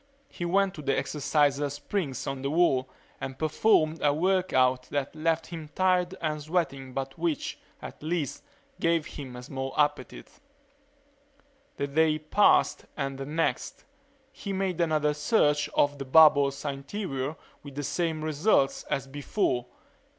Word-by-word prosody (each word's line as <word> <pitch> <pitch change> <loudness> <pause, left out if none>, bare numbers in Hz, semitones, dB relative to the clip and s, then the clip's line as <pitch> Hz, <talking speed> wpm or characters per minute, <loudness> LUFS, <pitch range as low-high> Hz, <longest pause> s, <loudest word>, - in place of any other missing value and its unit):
He 175 - -5
went 195 +2 +2
to 150 - -8
the 135 -1 0
exerciser 145 -1 +1
springs 145 - -3
on 135 -1 -4
the 140 - -1
wall 140 -5 +2 0.3
and 130 0 -6
performed 155 0 +2
a 145 - +4
work 185 +4 +1
out 130 0 +2
that 145 -1 -2
left 165 +1 0
him 165 -3 -8
tired 185 -1 +2
and 155 -2 -2
sweating 145 -5 -2
but 135 +4 -5
which, 165 -3 -2 0.2
at - - -9
least, 155 -3 -2 0.4
gave 165 -2 +2
him 130 -4 -8
a 125 - -8
small 135 +1 -5
appetite. 145 -3 -1 1.4
The 140 - -1
day 155 +2 +2
passed, 155 +7 +3
and 135 -2 -3
the 135 - -5
next. 160 +2 -2 0.5
He 200 -7 -6
made 190 -3 -1
another 155 -2 +2
search 150 -1 +2
of 145 0 +2
the 135 - -4
bubble's 140 -1 +5
interior 140 0 -3 0.3
with 140 -2 -11
the 145 - -3
same 160 +1 -1
results 155 -1 +2
as 135 - -2
before. 135 - -1
150 Hz, 145 wpm, -28 LUFS, 135-165 Hz, 1.4 s, bubble's